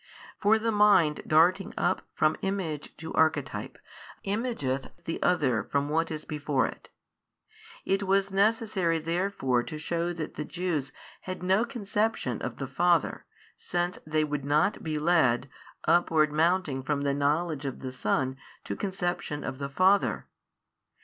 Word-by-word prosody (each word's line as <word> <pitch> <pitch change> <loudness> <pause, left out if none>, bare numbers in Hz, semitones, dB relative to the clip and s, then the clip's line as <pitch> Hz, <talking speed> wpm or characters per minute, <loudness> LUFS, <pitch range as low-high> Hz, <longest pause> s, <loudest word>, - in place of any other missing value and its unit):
For 215 +2 +4
the 225 +1 0
mind 205 -8 +4
darting 175 +5 +3
up - - 0
from 155 0 +3
Image 185 -7 -3
to 160 +1 -7
Archetype 145 -9 0 0.5
imageth 195 - -2 0.2
the 165 - -4
other 135 - +2
from 140 +5 -1
what 165 +2 +1
is 155 -1 -5
before 145 -3 0
it. - - -8 1.0
It 195 +1 +1
was 195 0 +1
necessary 200 -4 +2
therefore 165 -6 0
to 155 +5 -6
shew 170 +2 -2
that 160 -2 -5
the 150 - -4
Jews 155 -5 -2 0.4
had 185 -1 -5
no 190 +4 +3
conception 220 -3 -1
of - - -4
the - - -3
Father, - - +1 0.3
since 175 0 -2
they 155 0 +1
would 150 -2 -2
not 150 +7 +2
be 155 -2 -2
led, 150 -6 +3 0.4
upward 160 -2 +4
mounting 160 -3 +1
from 140 +2 -1
knowledge 145 +2 0
of 135 - -4
the 130 - -5
Son 130 +2 -1 0.3
to - - -4
conception 175 -6 -3
of 130 0 -5
the 140 -1 -3
Father. 190 +7 +2
160 Hz, 145 wpm, -28 LUFS, 145-190 Hz, 1.0 s, For